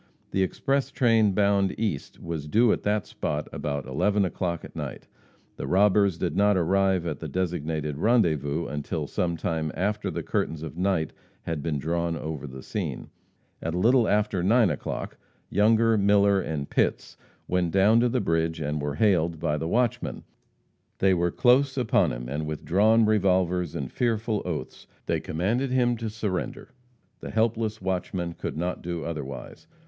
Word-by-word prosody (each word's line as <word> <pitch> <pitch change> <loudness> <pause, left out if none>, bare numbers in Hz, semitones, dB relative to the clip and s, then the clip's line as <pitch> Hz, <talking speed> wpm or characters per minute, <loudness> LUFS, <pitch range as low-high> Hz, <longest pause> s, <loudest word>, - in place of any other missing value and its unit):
The 95 - +1
express 135 +8 0
train 115 -7 +3
bound 100 -1 +2
east 105 -11 -3
was 80 -3 -5
due 115 +8 +4
at - - -3
that 105 0 0
spot 75 +1 -3
about 70 -1 -3
11 100 +10 +1
o'clock 85 -1 -3
at - - -13
night. - - -6 0.5
The 65 - -4
robbers 100 +1 +3
did 90 0 -2
not 100 0 +4
arrive 95 0 +2
at 75 -4 -3
the - - -5
designated 80 -5 -2
rendezvous 85 - +2
until 75 +2 -3
some 85 +3 -1
time 80 -1 -2
after 105 +3 -1
the - - -4
curtains 80 -1 -2
of 80 -1 -7
night 90 -3 0 0.3
had 80 -3 -3
been 75 -1 -1
drawn 85 +3 -1
over 75 -2 -5
the 65 0 -9
scene. - - -4 0.5
At 80 +1 -3
a - - -1
little 120 +4 +4
after 105 -3 +1
9 105 +1 +4
o'clock, 75 - -5 0.3
Younger, 110 +1 +4
Miller 100 -1 +4
and 75 -5 -3
Pitts - - 0 0.3
went 90 -1 +1
down 100 +6 +4
to 120 +1 +3
the 125 - 0
bridge, 80 -4 0
and 75 0 -2
were 75 0 -2
hailed 85 -4 +2
by 75 -2 0
the 80 +2 -3
watchman. 120 +5 0 0.7
They 95 -1 +3
were 85 -1 +1
close 130 +7 +3
upon 125 -4 +2
him, - - -5
and 75 +4 -3
with 75 -1 -5
drawn 110 +7 +4
revolvers 90 -5 +1
and 70 -3 -4
fearful 115 -2 0
oaths 80 -7 -5 0.2
they - - 0
commanded 110 +12 -1
him 125 -1 +2
to 115 -1 -4
surrender. 105 -4 -4 0.5
The - - -7
helpless 110 -1 0
watchman 90 -2 -2
could - - -5
not 90 +2 -2
do 85 -1 -4
otherwise. 70 -5 -7
90 Hz, 165 wpm, -26 LUFS, 80-105 Hz, 0.7 s, due